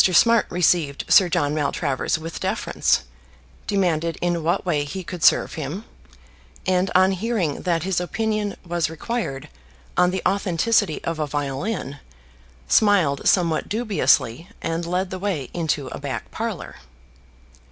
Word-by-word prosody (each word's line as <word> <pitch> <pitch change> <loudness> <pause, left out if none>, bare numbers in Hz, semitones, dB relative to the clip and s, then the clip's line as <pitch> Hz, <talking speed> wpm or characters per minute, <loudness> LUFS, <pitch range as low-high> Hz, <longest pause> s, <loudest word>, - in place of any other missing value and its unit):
Smart 230 +5 +4
received 170 -5 +1
Sir 185 -3 +6
John 145 -2 +1
Maltravers 145 -2 0
with 160 +1 -7
deference, - - 0 0.6
demanded 170 -5 0
in 175 -1 0
what 170 +5 0
way 155 -5 +1
he 185 +6 -6
could 175 0 -7
serve - - +4
him; 160 +8 -5 0.8
and 185 +1 +2
on 185 +1 +5
hearing 195 -5 -1
that 170 -3 0
his 190 -1 0
opinion 215 +2 -1
was 170 -2 -1
required 160 - -4 0.5
on 180 0 +4
the 185 0 -3
authenticity 195 -1 +1
of 165 -1 -3
a 150 - -1
violin, 145 +2 -3 0.7
smiled 190 -10 +3
somewhat 170 -4 +2
dubiously 195 - +1
and 165 +1 -3
led 180 +2 -1
the 185 - -4
way 180 -10 -3
into 160 -4 -1
a - - -7
back 135 -5 -5
parlour. - - -5
175 Hz, 135 wpm, -23 LUFS, 155-190 Hz, 0.8 s, Sir